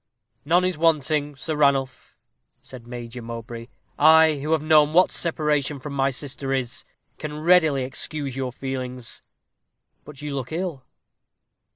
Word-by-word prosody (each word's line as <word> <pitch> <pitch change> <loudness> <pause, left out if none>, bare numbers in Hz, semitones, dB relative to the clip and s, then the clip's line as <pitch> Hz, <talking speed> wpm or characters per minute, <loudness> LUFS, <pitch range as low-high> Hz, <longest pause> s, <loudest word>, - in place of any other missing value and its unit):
"None 175 +4 +3
is 185 -4 -2
wanting, 150 -2 +1
Sir 155 +4 -3
Ranulph," 140 -3 0 0.4
said 120 -3 -12
Major 120 0 -7
Mowbray. 115 0 -7 0.3
"I 160 0 +6
who 150 +3 -3
have 155 -2 +1
known 155 -1 +4
what 180 +2 +5
separation 150 -4 0
from 140 +2 -7
my 135 0 +1
sister 135 0 -3
is, 130 -3 -2 0.3
can 150 0 -5
readily 160 -5 +4
excuse 135 +1 -4
your 130 -1 -3
feelings. 125 -2 -5 0.8
But 145 -1 -12
you 150 -1 -4
look 130 -2 -4
ill." 165 -5 -4
140 Hz, 140 wpm, -24 LUFS, 130-155 Hz, 0.8 s, I